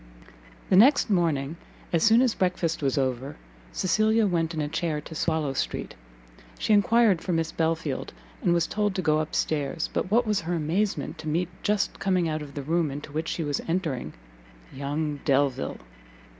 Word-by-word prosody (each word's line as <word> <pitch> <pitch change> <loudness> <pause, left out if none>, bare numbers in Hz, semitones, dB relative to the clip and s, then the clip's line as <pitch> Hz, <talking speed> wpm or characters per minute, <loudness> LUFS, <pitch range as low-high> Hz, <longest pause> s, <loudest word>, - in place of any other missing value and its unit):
The - - +6
next 235 +3 +6
morning, 165 -5 +1 0.4
as 165 - +3
soon 225 +3 +6
as 250 -4 +2
breakfast 180 -3 -1
was 135 -1 0
over, 130 +1 -1 0.4
Cecilia 215 +4 +2
went 170 -3 0
in - - -2
a 150 - -1
chair 160 0 -2
to 155 - -10
Swallow 160 -3 0
street; - - -3 0.6
she 215 - +1
enquired 210 -3 +4
for 180 - -2
Miss 165 0 0
Belfield, 160 -4 -1 0.3
and - - +2
was 170 -1 +3
told 205 0 -1
to 185 - -1
go 155 -1 +3
up 155 0 -3
stairs: 150 +1 -1
but - - -1
what 235 +4 +3
was 210 -2 +1
her 170 +2 -2
amazement 170 +6 -1
to 155 - -7
meet, 170 +3 0
just 210 -1 0
coming 185 -3 +1
out 155 -1 -2
of 145 -2 -9
the 140 - -4
room 165 +2 +1
into 145 +2 -7
which 155 +2 -3
she 165 - -2
was 145 -2 -1
entering, 160 - -2 0.6
young 145 +2 -3
Delvile! 135 - +1
165 Hz, 180 wpm, -26 LUFS, 150-185 Hz, 0.6 s, The